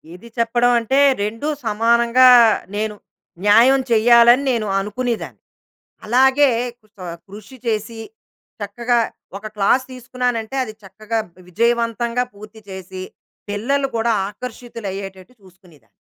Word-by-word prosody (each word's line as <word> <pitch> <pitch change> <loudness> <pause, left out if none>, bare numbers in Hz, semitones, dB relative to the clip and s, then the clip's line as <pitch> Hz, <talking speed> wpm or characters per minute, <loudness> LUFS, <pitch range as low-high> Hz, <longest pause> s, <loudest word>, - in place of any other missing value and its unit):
ఇది 190 +6 -14
చెప్పడం 240 +1 +2
అంటే, 250 +4 -1 0.3
రెండూ 225 +8 -4 0.2
సమానంగా, 235 +3 +4 0.5
నేను 210 0 -2 0.5
న్యాయం 245 +6 +5
చేయ్యాలని, 235 +3 +5
నేను 225 -4 -1
అనుకునేదాన్ని. 225 +4 -4 0.7
అలాగే 265 +4 +4 0.3
కు 215 - -28 0.2
ఆహ్, 170 0 -7
కృషి 215 +6 -12
చేసి, 225 0 -2 0.6
చక్కగా 235 +4 -1 0.4
ఒక 205 - -21
క్లాస్ 245 +6 +2
తీసుకున్నానంటే, 250 -1 -3
అది 215 - -8
చక్కగా 215 +4 -5 0.2
వి 185 - -17
విజయవంతంగా 235 +3 0
పూర్తి 215 +2 -13
చేసి, 190 0 -8 0.5
పిల్లలు 270 +7 -1
కూడా 230 +1 +1 0.2
ఆకర్షితులయ్యేటట్టు 205 -3 -8
చూసుకునేదాన్ని. 175 - -22
230 Hz, 110 wpm, -19 LUFS, 205-245 Hz, 0.7 s, న్యాయం